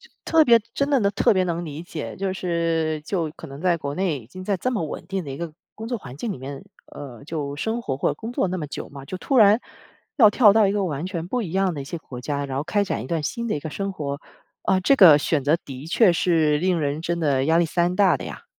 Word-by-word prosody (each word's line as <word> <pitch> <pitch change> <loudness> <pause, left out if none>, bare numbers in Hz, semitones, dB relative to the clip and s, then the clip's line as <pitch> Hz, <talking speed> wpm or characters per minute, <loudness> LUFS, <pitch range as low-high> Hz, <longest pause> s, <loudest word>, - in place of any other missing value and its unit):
就 475 - -19 0.2
特 325 -1 +5
别 235 -5 +6
真 280 +1 0
的 275 -3 +3
能 200 -2 +2
特 205 - +3
别 185 -2 +2
能 170 -1 -2
理 155 +1 -7
解。 165 -3 -6
就 190 -1 -2
是 165 -3 -1
就 170 -6 -2
可 165 - -10
能 140 +3 -10
在 175 -2 +2
国 140 -2 -4
内 175 -6 -1
已 110 - -16
经 185 +7 -10
在 195 0 0
这 255 +8 -1
么 210 -9 -1
稳 - - -7
定 190 -2 -3
的 145 - -8
一 135 - -6
个 165 -1 -5 0.2
工 220 +1 -7
作 240 -1 -2
环 130 -9 -10
境 220 +8 -3
里 - - -6
面 135 +1 -8 0.2
呃， 135 -4 -10
就 145 -3 -4
生 225 +9 -2
活 135 - -3
或 - - 0
工 225 +1 -7
作 195 - 0
那 185 - -3
么 160 - -3
久 - - -7
嘛， 140 -1 -10
就 185 - -6
突 265 +8 0
然 210 0 +6 0.6
要 220 -7 +7
跳 210 -1 +6
到 220 -2 +5
一 - - +1
个 200 -1 0
完 155 -1 -3
全 175 -2 -4
不 245 +4 -1
一 175 - -5
样 190 0 +1
的 145 - -5
一 - - -6
些 165 +5 -6
国 125 -6 -10
家， 140 +1 -2
然 135 -1 -4
后 140 - -1
开 205 +4 +1
展 155 - -3
一 - - -8
段 165 +1 -1
新 235 +9 -3
的 215 - 0
一 - - -3
个 155 +2 -6
生 195 +4 -3
活， 140 -4 -4 0.4
啊， 190 - +2
这 230 +9 +4
个 180 - +9
选 145 -1 0
择 150 +4 +3
的 135 +1 -8
确 180 +3 +4
是 160 -4 +2
令 180 +2 +1
人 145 0 -2
真 170 +1 -2
的 140 -4 +1
压 160 +2 +3
力 170 - +3
山 175 +2 0
大 200 -1 +4
的 - - -8
呀。 - - -8
170 Hz, 305 characters per minute, -23 LUFS, 150-195 Hz, 0.6 s, 个